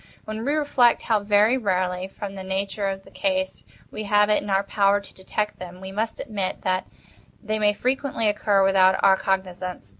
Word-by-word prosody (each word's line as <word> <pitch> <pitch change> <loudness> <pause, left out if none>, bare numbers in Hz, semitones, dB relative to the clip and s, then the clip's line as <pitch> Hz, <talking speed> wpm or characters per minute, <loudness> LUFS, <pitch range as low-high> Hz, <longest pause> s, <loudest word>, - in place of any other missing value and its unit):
When 215 +1 -5
we 285 +4 0
reflect 285 -6 +3
how 220 -2 +2
very 210 +5 +3
rarely, 185 -3 -1
from 195 0 -7
the 195 - -7
nature 195 +2 -2
of 195 0 -4
the - - -17
case, 280 -1 -2 0.3
we 215 - -5
have 210 +1 +3
it - - +3
in 205 - -7
our 195 0 +2
power 200 0 +2
to 200 - -15
detect 210 +2 -3
them, 180 0 -9
we 190 0 -8
must 220 +3 -3
admit 200 -7 -4
that 185 0 0 0.6
they 215 0 -2
may 210 -1 +3
frequently 255 0 -1
occur 205 -1 +2
without 190 -1 +4
our 195 - +7
cognizance. 185 - -3
200 Hz, 190 wpm, -24 LUFS, 190-215 Hz, 0.6 s, our